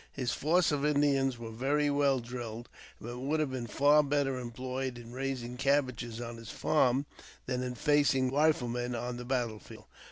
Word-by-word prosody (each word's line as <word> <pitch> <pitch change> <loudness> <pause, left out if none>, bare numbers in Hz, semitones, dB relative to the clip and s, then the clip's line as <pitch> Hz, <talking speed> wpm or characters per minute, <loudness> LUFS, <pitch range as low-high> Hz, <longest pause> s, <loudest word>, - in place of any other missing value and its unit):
His 125 -3 -2
force 165 +3 +2
of 145 -1 0
Indians 140 -3 +2
were 115 -1 -7
very 145 +5 +1
well 140 -2 +3
drilled, 120 -1 -7 0.3
but 120 +2 -7
would 145 +5 0
have 150 -3 0
been 125 -2 -4
far 145 +6 +5
better 140 -2 0
employed 125 +1 -4
in 120 0 -10
raising 125 -2 -4
cabbages 130 -4 0
on 120 -1 -6
his 115 -1 -10
farm 135 -2 +2 0.4
than 125 -1 -2
in 125 -1 -3
facing 145 -1 +3
rebel 145 - +1 0.3
riflemen 120 +1 -2
on 120 +1 -4
the 120 - -7
battle 120 -4 -1
field. - - -13
130 Hz, 180 wpm, -31 LUFS, 120-140 Hz, 0.4 s, far